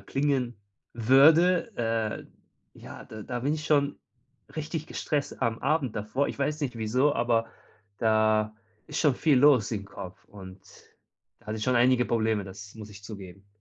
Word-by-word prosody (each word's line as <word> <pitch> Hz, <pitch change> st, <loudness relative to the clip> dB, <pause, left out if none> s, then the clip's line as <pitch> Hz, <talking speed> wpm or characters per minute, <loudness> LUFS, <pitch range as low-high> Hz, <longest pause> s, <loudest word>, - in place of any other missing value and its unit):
klingen 130 Hz, +2 st, -1 dB, 0.4 s
würde. 155 Hz, -, +5 dB
Äh, 115 Hz, -2 st, -2 dB, 0.5 s
ja, -, -, -10 dB
da 110 Hz, -1 st, -9 dB
da 120 Hz, +3 st, -4 dB
bin 140 Hz, +4 st, 0 dB
ich 155 Hz, -1 st, -6 dB
schon 145 Hz, -1 st, +2 dB, 0.6 s
richtig 155 Hz, 0 st, -4 dB
gestresst 145 Hz, -2 st, -3 dB
am 115 Hz, -2 st, 0 dB
Abend 145 Hz, -7 st, 0 dB
davor. 110 Hz, +7 st, -1 dB
Ich -, -, -7 dB
weiß 150 Hz, +2 st, -1 dB
nicht 130 Hz, -4 st, -3 dB
wieso, 125 Hz, +6 st, +1 dB
aber 115 Hz, -1 st, +1 dB, 0.5 s
da 110 Hz, -1 st, +2 dB, 0.3 s
ist -, -, -4 dB
schon 150 Hz, -5 st, +3 dB
viel 145 Hz, 0 st, +3 dB
los 130 Hz, -6 st, +5 dB
im 105 Hz, -4 st, -3 dB
Kopf 95 Hz, -2 st, -10 dB
und 95 Hz, -2 st, -12 dB, 0.8 s
da -, -, -25 dB
hatte 110 Hz, +1 st, -3 dB
ich 105 Hz, -, -3 dB
schon 125 Hz, -1 st, +2 dB
einige 125 Hz, +1 st, +4 dB
Probleme, 110 Hz, -3 st, 0 dB
das 100 Hz, +2 st, -11 dB
muss 110 Hz, -1 st, -10 dB
ich 100 Hz, 0 st, -13 dB
zugeben. 100 Hz, -2 st, -10 dB
120 Hz, 165 wpm, -27 LUFS, 110-140 Hz, 0.8 s, würde